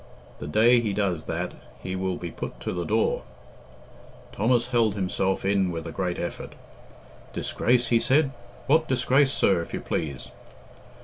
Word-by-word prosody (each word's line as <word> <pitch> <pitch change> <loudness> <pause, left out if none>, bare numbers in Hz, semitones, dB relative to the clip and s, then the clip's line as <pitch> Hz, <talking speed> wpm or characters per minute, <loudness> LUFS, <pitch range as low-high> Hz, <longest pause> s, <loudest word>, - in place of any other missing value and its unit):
The 70 - -6
day 115 +10 +5
he 110 -4 -1
does 95 -6 -1
that - - -3 0.3
he 95 0 -3
will 95 -1 -2
be 85 -2 -6
put - - -7
to - - -3
the 90 -1 -3
door." 110 +1 +1 1.1
Thomas 120 +4 +1
held 115 -5 +2
himself 95 0 -1
in 100 -2 +2
with 85 -1 -5
a 80 - -5
great 90 +1 -2
effort. - - -5 0.8
"Disgrace?" 120 -1 +1
he 115 - +4
said. 135 +3 +3 0.3
"What 155 +3 +3
disgrace, 135 +1 +3
sir, 95 -9 +2
if 85 - -6
you - - -3
please?" 70 -5 -4
100 Hz, 160 wpm, -26 LUFS, 90-120 Hz, 1.1 s, day